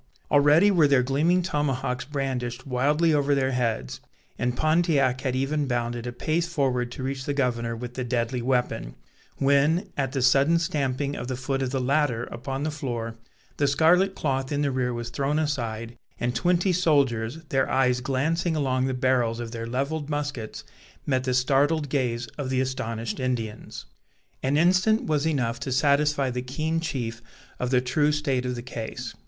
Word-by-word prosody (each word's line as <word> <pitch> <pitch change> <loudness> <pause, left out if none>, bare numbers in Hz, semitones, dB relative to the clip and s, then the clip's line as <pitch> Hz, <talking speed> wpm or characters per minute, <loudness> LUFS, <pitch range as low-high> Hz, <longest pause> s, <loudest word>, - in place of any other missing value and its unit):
Already 150 +8 +5
were 165 -6 +5
their 140 -3 +4
gleaming 160 +8 +2
tomahawks 135 -6 -1
brandished 130 -3 -3
wildly 145 +5 +2
over 145 -1 +2
their 135 -1 +1
heads, 115 - -1 0.4
and 125 +1 -1
Pontiac 155 -5 +2
had 130 -2 -1
even 140 +2 0
bounded 120 -1 -2
a - - -3
pace 155 +7 -1
forward 130 -7 0
to 130 - -6
reach 130 0 -3
the 145 - -2
governor 120 -4 0
with 120 +1 -7
the 130 - -3
deadly 120 0 -1
weapon, 120 - -1 0.4
when, 140 +6 +2
at 135 -2 -1
the 135 -3 0
sudden 140 +6 +4
stamping 145 -4 -1
of 120 - -5
the 130 - -2
foot 135 +2 -2
of 130 - 0
the 135 +1 -1
latter 130 -2 +1
upon 135 +3 -4
the 155 - -1
floor, 120 -6 -4 0.4
the 145 - +2
scarlet 175 +7 +3
cloth 135 -2 -1
in 145 0 0
the 140 - +1
rear 130 -1 0
was 120 0 -5
thrown 140 +4 0
aside, 120 -7 -2 0.2
and 120 0 -1
twenty 180 +8 +2
soldiers, 140 -8 +2
their 135 -1 +1
eyes 125 -1 +2
glancing 160 +6 0
along 130 -3 +1
the 130 - -1
barrels 125 -3 +1
of 115 -1 -5
their 115 -1 -5
levelled 140 +5 -2
muskets, 145 -7 -4 0.4
met 130 -2 0
the 130 - 0
startled 145 +4 +2
gaze 120 -4 -1
of 135 -2 -2
the 130 -1 +1
astonished 115 -3 -3
Indians. 120 -5 -4 0.6
An 135 +2 +1
instant 185 +7 +3
was 155 0 0
enough 125 -6 0
to 130 +2 -4
satisfy 140 0 +2
the 125 0 -3
keen 155 +6 -2
chief 120 -8 -4 0.4
of 125 - -1
the 125 -1 +3
true 145 +4 +2
state 140 -4 -1
of 125 - -2
the 120 - -6
case. 115 -3 -6
135 Hz, 175 wpm, -25 LUFS, 125-150 Hz, 0.6 s, Already